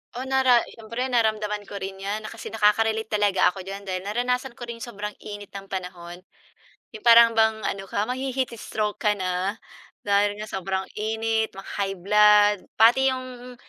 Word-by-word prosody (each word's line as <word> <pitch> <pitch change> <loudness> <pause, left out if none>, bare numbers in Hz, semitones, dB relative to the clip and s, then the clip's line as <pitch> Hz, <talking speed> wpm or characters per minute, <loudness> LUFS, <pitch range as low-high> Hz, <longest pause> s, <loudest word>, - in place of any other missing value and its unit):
Oh, 250 - -4
nara 260 -3 +3
siyempre 230 +3 -5
naramdaman 215 -3 0
ko - - -9
rin 195 -1 -6
'yan, 205 +2 -4
na 215 - -7
kasi - - -9
nakaka-relate 220 +1 +1
talaga 205 -3 +3
ako 195 - -10
diyan, 195 +1 -7
dahil 185 0 -4
naranasan 245 +3 -1
ko - - -10
rin 235 -1 -7
yung 240 - -7
sobrang 210 -2 -5
init 205 -1 -9
ng 195 0 -9
panahon. 180 -2 -7 0.7
'Yong 215 0 -12
parang 230 0 +8
bang 220 -1 +2
ano 195 - -3
ka 205 - -1
mahi-heat 260 +1 -2
stroke 210 -2 -3
ka 210 -1 +2
na, 185 +1 -2 0.5
dahil 205 0 +2
nga 215 +1 -6
sobrang 190 0 -2
init, 220 0 -1
maka-high 195 0 -4
blood, 210 +2 +5 0.2
pati 240 +4 +5
yung 250 -1 -9
210 Hz, 170 wpm, -24 LUFS, 200-230 Hz, 0.7 s, parang